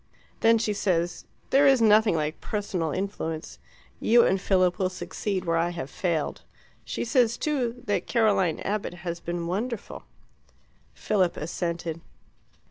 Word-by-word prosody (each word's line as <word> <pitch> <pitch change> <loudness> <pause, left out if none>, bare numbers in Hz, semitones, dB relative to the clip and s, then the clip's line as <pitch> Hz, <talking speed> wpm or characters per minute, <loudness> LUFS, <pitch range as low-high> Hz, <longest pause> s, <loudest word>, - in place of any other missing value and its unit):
Then 230 0 +5
she 220 -1 0
says, 175 -4 -1 0.3
'There 280 +1 +6
is 270 -2 +5
nothing 215 -3 +5
like 155 0 -2
personal 200 -6 -2
influence; 165 -3 -4 0.4
you 235 +1 +5
and 190 0 +1
Philip 185 -2 +2
will 185 -1 +1
succeed 185 +2 -4
where 165 -1 +1
I 170 +1 +1
have 165 -6 -6
failed.' 170 -5 -2 0.4
She - - -4
says, 240 -1 +2
too, 250 -5 -2
that 205 - -1
Caroline 205 -8 +2
Abbott 200 -3 -2
has 170 -1 -3
been 170 0 -4
wonderful." 210 +6 -4 0.9
Philip 190 -4 +1
assented. 170 0 -3
190 Hz, 135 wpm, -26 LUFS, 170-220 Hz, 0.9 s, There